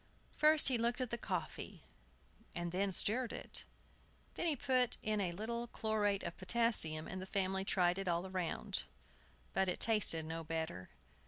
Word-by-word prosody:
First 305 0 +6
he 250 -3 +1
looked 235 +2 0
at 255 -3 -2
the - - 0
coffee, - - -5 0.7
and 175 0 -3
then 195 +2 0
stirred 230 +6 +1
it. - - -3 0.7
Then 345 - -2
he 310 - +2
put 255 -1 +1
in 215 -1 0
a 180 -3 -1
little 235 +6 -4
chlorate 210 -3 0
of 170 - -4
potassium, 185 -6 +1
and 190 -1 -5
the 185 - -7
family 190 0 -1
tried 180 -1 +1
it 195 - -4
all 175 +1 0
round; 185 -3 -2 0.7
but 190 -1 +1
it 180 - -2
tasted 210 -8 +5
no 165 +1 -5
better. 160 - -4
195 Hz, 165 wpm, -36 LUFS, 175-235 Hz, 0.7 s, First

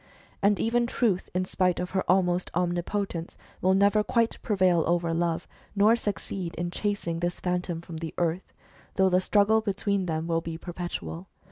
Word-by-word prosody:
And 200 0 +3
even 235 +1 +2
Truth, 220 -7 0
in 185 0 +1
spite 185 -1 +1
of 180 0 -3
her 190 0 0
almost 180 -1 +2
omnipotence, 175 0 -2 0.2
will 190 +1 +4
never 200 +2 +4
quite 230 +1 0
prevail 185 -5 +3
over 170 -1 +1
Love, 165 0 -1 0.3
nor 210 +3 +5
succeed 195 -5 -4
in 175 0 -3
chasing 200 -5 -2
this 175 +1 -2
Phantom 180 -2 -2
from 170 -1 -8
the 160 -1 -6
earth, 175 +1 -1 0.4
though 190 -1 +4
the 180 0 +3
struggle 210 +3 +3
between 200 -2 -1
them 160 -1 -1
will 165 0 0
be 165 0 -5
perpetual. 175 0 -6
180 Hz, 165 wpm, -27 LUFS, 170-200 Hz, 0.4 s, nor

